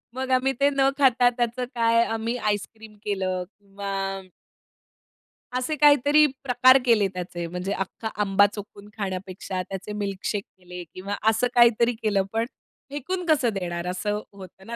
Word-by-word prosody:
मग 260 0 -3
आम्ही 260 +1 +2
ते 280 - +5
न 275 -1 +2
खाता 255 -3 +5
त्याचं 240 +1 -1
काय 230 0 +3
आम्ही 225 +2 -2
आईसक्रीम 215 0 -4
केलं 185 -3 -1 0.2
किंवा 200 0 -7 1.7
असे 255 +5 -1
काहीतरी 295 0 +5 0.2
प्रकार 255 0 +6
केले 215 -5 +4
त्याचे 175 -1 -5
म्हणजे 180 +3 -4
अख्खा 205 +3 -4
आंबा 200 0 +4
चोखून 205 0 -10
खाण्यापेक्षा 190 -1 -4
त्याचे 195 +2 -6
मिल्कशेक 200 0 -3
केले 180 -1 -9
किंवा 200 +2 -4
असं 220 +3 +2
काहीतरी 235 0 +5
केलं. 210 -3 0
पण 225 +1 +1 0.4
फेकून 350 +6 -4
कसं 290 -7 +3
देणार 175 -2 -4
असं 205 +3 -2
होतं 190 -1 -13
ना 235 - -5
215 Hz, 140 wpm, -25 LUFS, 195-250 Hz, 1.7 s, प्रकार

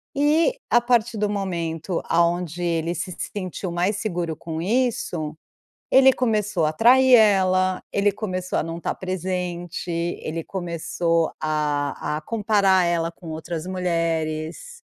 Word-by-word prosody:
e, 315 - +2
a 240 - +5
partir 240 -2 +1
do 210 0 0
momento 170 -4 -2
aonde 170 0 +1
ele 170 0 0
se 185 +3 -4
sentiu 185 0 -5
mais 180 +4 0
seguro 175 -6 -2
com 160 0 -6
isso, 180 -8 -1 0.5
ele 265 0 +7
começou 210 -9 0
a 155 - 0
trair 255 +6 +5
ela, 185 -4 +4
ele 200 0 +3
começou 185 -3 -3
a - - +1
não 165 +1 -5
tá - - -2
presente, 180 -1 -4
ele 165 -1 -3
começou 170 -2 -1
a 150 -1 -1
a - - -6
comparar 200 -2 +2
ela 170 -1 0
com 170 0 -14
outras 160 +2 -5
mulheres, 165 - -2
180 Hz, 130 wpm, -23 LUFS, 165-205 Hz, 0.5 s, ele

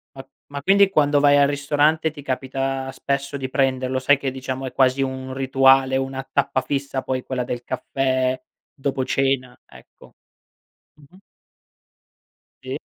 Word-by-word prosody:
A 135 0 -10 0.2
ma 140 0 -6
quindi 200 +2 +5
quando 145 -5 +3
vai 145 0 +5
al 140 - +5
ristorante, 145 +3 +1
ti 145 - -11
capita 135 0 -3
spesso 140 +1 -3
di 130 -1 -4
prenderlo, 130 -1 0
sai 140 +2 +4
che 135 -1 -3
diciamo 130 0 -5
è 130 - -5
quasi 130 +1 +2
un 130 -1 -3
rituale, 135 0 +4
una 135 0 -3
tappa 140 -1 +1
fissa 135 0 -3
poi 130 -1 -3
quella 125 -2 -3
del 120 0 -5
caffè 130 0 -1 0.3
dopo 135 -2 -2
cena, 135 -1 -1
ecco. - - -18 0.8
Mh-mh. 150 +5 -20 1.5
Sì. - - -4
135 Hz, 145 wpm, -22 LUFS, 130-140 Hz, 1.5 s, quindi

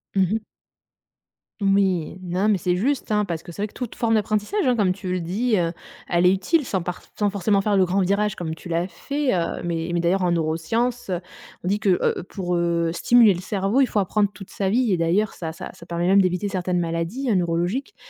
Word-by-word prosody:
Mmh 190 - +4
mh. 220 -1 -2 1.2
Oui, 195 -4 +1
non, 185 +4 0
mais 205 - +3
c'est 180 +1 0
juste, 240 +3 0
hein, 210 0 +3
parce 170 -5 -3
que 170 - -11
c'est 200 - -6
vrai 210 - 0
que - - -22
toute 250 -3 -6
forme 230 -2 +1
d'apprentissage 215 - 0
hein, 250 - +3
comme 200 -5 +2
tu 185 0 -5
le 180 -1 -1
dis, 215 +7 0
heu, 170 -2 +1 0.4
elle 175 0 +2
est 180 - +6
utile 280 - +1
sans 190 -6 -1
parf 175 +1 -6
sans 205 -1 +2
forcément 200 0 +1
faire 205 0 +1
le 190 - +5
grand 190 +2 +1
virage 200 +2 +1
comme 160 -2 -4
tu 165 - -11
l'as 170 +1 0
fait, 280 - -2
heu. 170 -3 -1
Mais 165 -1 -2
mais 170 - +1
d'ailleurs 180 +3 +1
en 175 - +2
neuroscience, 175 +10 -1
heu, 180 -1 -1 0.4
on - - -4
dit 205 +2 +1
que, 195 -4 +3
heu, - - 0
pour, 180 -1 -3
heu, 170 -1 +1
stimuler 235 +3 +5
le 175 - -5
cerveau, 195 +5 0
il 275 - +6
faut 210 - 0
apprendre 205 +1 +1
toute 195 -3 -11
sa 195 -1 -1
vie 235 +2 +2
et 185 - +2
d'ailleurs 175 +6 +1
ça-ça 165 +1 -6
ça 170 - -14
permet 170 0 -2
même 195 +1 +6
d'éviter 185 +2 0
certaines 180 -1 -1
maladies 170 +11 -2
hein, 215 - +3
neurologiques. 175 - -1
190 Hz, 230 wpm, -23 LUFS, 175-210 Hz, 1.2 s, est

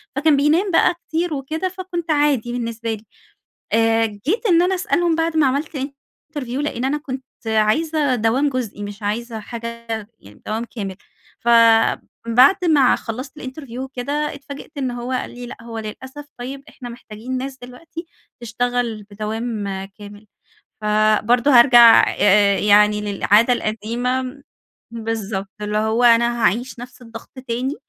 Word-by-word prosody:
فكان 295 0 +3
بينام 325 +7 +2
بقى 355 +2 +4
كتير 330 0 -1
وكده 310 +7 -3
فكنت 360 -3 -5
عادي 290 -6 +1
بالنسبة 230 -2 -3
لي، 215 +1 -9 0.7
آآ، 225 0 +3
جيت 260 - -3
إن 345 -3 +5
أنا 370 +1 +2
أسألهم 350 -3 +1
بعد 325 -1 -1
ما 295 - +4
عملت 285 +3 -2
interview 275 0 -8
لأن 260 -4 -2
أنا 280 +3 0
كنت 265 -3 -6 0.2
عايزة 260 +6 +1
دوام 245 +6 +1
جزئي 235 -6 -4
مش 205 +1 -8
عايزة 225 +2 -3
حاجة 230 +1 -8 0.3
يعني 105 +1 -17
دوام 225 +2 -2
كامل، 200 -6 -6 0.4
فبعد 230 +6 +4
ما 285 -6 +4
خلصت 255 +4 -7
الInterview 260 -2 -8
وكده 265 +1 -5 0.2
اتفاجئت 280 +1 -10
إن 260 -2 -2
هو 245 +1 -5
قال 255 - -2
لي: 245 0 -9
"لأ - - -9
هو 230 -1 -6
للأسف 260 +7 -8
طيب 270 +3 -6
إحنا 245 -3 -10
محتاجين 235 +2 -7
ناس 265 +1 -5
دلوقتي 325 +7 -10 0.3
تشتغل 240 -1 -2
بدوام 215 +1 -4 0.2
كامل،" 205 +1 -13 0.5
فبرضه 215 +5 +3
هارجع 240 -2 +8 0.5
يعني 210 0 +4
للعادة 210 +3 +3
القديمة 245 +5 -3 0.5
بالضبط 220 -4 -4
اللي 210 0 -2
هو 220 +3 +1
أنا 235 0 +4
هاعيش 240 +3 0
نفس 250 +1 -11
الضغط 230 -1 -11 0.2
تاني، 250 +5 -2
245 Hz, 140 wpm, -20 LUFS, 225-280 Hz, 0.7 s, هارجع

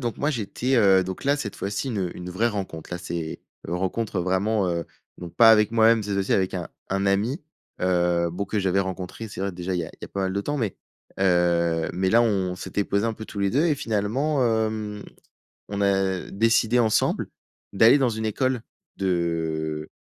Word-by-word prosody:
donc 120 -3 -3
moi 145 - +1
j'étais, 125 +2 -1
heu 95 -4 +5
donc 95 +5 -6
là, 140 +1 +3
cette 110 -9 -5
fois-ci 100 +6 -3
une 95 -7 -2
une 90 0 -7
vraie 110 +6 +1
rencontre. 95 -7 -5
Là 90 - -3
c'est, 85 -2 -5 0.3
heu, 85 - -2
rencontre 95 +3 -2
vraiment, 95 +3 +1
heu 85 -1 -1 0.3
donc 85 -1 -9
pas 115 -2 +8
avec 105 -2 +5
moi-même, 115 0 +4
cette 100 -1 -3
fois-ci 100 0 0
avec 95 -1 +1
un 90 -3 -4 0.2
un 95 +1 0
ami. 105 - 0 0.4
Heu, 90 -1 +2
bon, 90 +4 -3
que 105 +2 -2
j'avais 95 0 +2
rencontré, 95 +3 -5
c'est 100 - -8
vrai 100 0 -2
déjà 90 +1 -4
il 90 - 0
y - - -2
a - - -8
il - - -26
y - - -3
a - - -10
pas 100 - -4
mal 95 0 -1
de 100 - -1
temps, 145 +8 -2
mais, 110 -6 -2 0.4
heu, 85 -3 +2
mais 95 +1 0
là 115 - +5
on 95 -5 0
s'était 95 +3 -2
posés 100 +3 0
un 115 - -1
peu 110 - -8
tous 105 - -9
les 100 -1 +1
2 145 +6 +2
et 155 - +3
finalement, 125 +6 0
hem, 110 -2 -1 0.7
on 100 0 -3
a 95 -2 +1
décidé 115 +3 +2
ensemble 110 -3 +2 0.4
d'aller 110 +7 +6
dans 130 -3 +2
une 110 -1 -3
école 130 +2 0 0.4
de, 80 -4 -1
100 Hz, 210 wpm, -24 LUFS, 90-110 Hz, 0.7 s, pas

